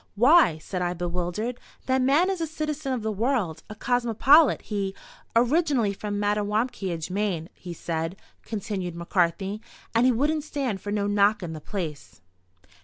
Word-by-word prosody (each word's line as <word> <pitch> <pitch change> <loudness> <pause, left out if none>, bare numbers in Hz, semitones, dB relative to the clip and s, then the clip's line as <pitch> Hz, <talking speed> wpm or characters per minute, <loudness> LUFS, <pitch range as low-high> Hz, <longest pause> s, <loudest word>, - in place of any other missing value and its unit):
"Why," 250 - +6
said 180 +3 -5
I, 175 0 -1
bewildered, 180 +7 -3 0.3
"that 260 0 +2
man 295 +9 +3
is 375 -3 -3
a 325 - 0
citizen 305 -2 -3
of 250 -4 -2
the 220 - -1
world—a 215 - -1
cosmopolite. 245 +5 +4
He—" 200 -2 -3 0.4
"Originally 250 -3 +3
from 205 0 -4
Mattawamkeag, 205 -4 -1
Maine, 185 -4 -1
he 180 - -9
said," 165 +1 -3 0.3
continued 200 -5 -4
McCarthy, 180 +4 0 0.3
"and 235 +2 +4
he - - +5
wouldn't 295 +6 +1
stand 270 - -3
for 205 - -5
no 205 -1 0
knockin' 205 -3 +2
the 155 - -7
place." 155 -7 -6
210 Hz, 145 wpm, -26 LUFS, 180-255 Hz, 0.4 s, Why